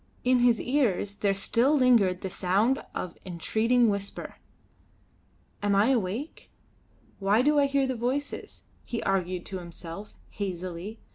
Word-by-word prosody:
In 255 0 +4
his 240 -2 +4
ears 245 -7 0
there 200 -1 0
still 235 +8 +2
lingered 225 -9 +4
the 190 - -3
sound 205 +11 +1
of 180 -2 -4
entreating 220 +7 +1
whisper. 200 -1 -3 1.2
"Am 205 -1 +2
I 205 +5 +4
awake? 240 - -2 0.7
Why 205 +4 +3
do 295 +1 +4
I 280 - +4
hear 275 0 +2
the 260 - -1
voices?" 255 +5 -3 0.2
he 235 - -4
argued 185 -2 -1
to 190 - -5
himself, 170 +3 -9 0.2
hazily. 185 +1 -5
210 Hz, 135 wpm, -27 LUFS, 190-250 Hz, 1.2 s, In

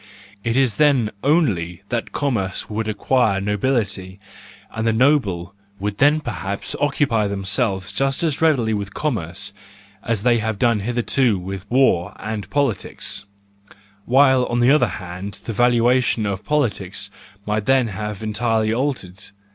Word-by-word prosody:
It 115 +2 0
is 130 -6 +2
then 135 -8 +3
only 100 - +1
that 120 -1 -2
commerce 110 -10 -1
would 110 +1 -2
acquire 110 -1 +1
nobility, 105 -2 -1 0.5
and 110 0 -2
the - - +4
noble 110 - +2 0.3
would 100 +1 -3
then 150 +2 +4
perhaps 100 -5 -4
occupy 135 -7 +1
themselves 100 0 -1
just 135 +3 0
as 155 -3 0
readily 130 -9 +3
with 100 -1 -4
commerce 100 - -2 0.5
as 115 -3 -1
they 120 -1 +4
have 110 -1 -2
done 115 0 +2
hitherto 120 +1 +1
with 95 +2 -7
war 105 -7 +2
and 105 -2 -5
politics: 120 -6 -1 0.8
while 130 0 +4
on 120 - -2
the 120 +2 +4
other 150 - +4
hand 95 +2 -7
the 115 - -4
valuation 120 0 +3
of 100 -1 -3
politics 105 -9 -1 0.3
might 105 0 -1
then 130 -3 +3
have 105 +1 -5
entirely 110 0 0
altered. 115 -8 -3
110 Hz, 140 wpm, -21 LUFS, 100-130 Hz, 0.8 s, the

